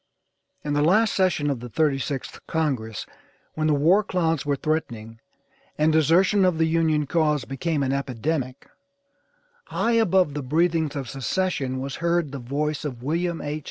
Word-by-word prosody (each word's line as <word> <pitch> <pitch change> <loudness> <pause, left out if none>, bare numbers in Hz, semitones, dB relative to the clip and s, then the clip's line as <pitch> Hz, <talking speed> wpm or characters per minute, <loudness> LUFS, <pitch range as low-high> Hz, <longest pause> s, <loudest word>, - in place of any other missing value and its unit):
In 145 - -2
the 145 - +2
last 210 +8 +3
session 165 -6 +1
of 135 - -3
the 120 +1 -8
36th 140 -1 -1
Congress, 130 - -2 0.5
when 155 0 -1
the 150 - +3
war 170 +9 +4
clouds 165 -6 -1
were 145 - +2
threatening, 115 -7 -3 0.6
and 155 +1 +3
desertion 175 +6 +4
of 180 -3 +2
the 160 - +3
Union 160 -2 +1
cause 150 -3 +1
became 140 +3 -2
an 135 0 0
epidemic, 135 0 -3 1.0
high 235 - -1
above 190 -9 +3
the 145 - -3
breathings 160 +2 +1
of 135 -3 -4
secession 135 - -2
was 135 +1 -5
heard 170 -3 0
the 140 - -6
voice 145 +4 -2
of 125 -5 -6
William 170 +4 -1
H. 150 +1 -3
150 Hz, 160 wpm, -24 LUFS, 135-165 Hz, 1.0 s, war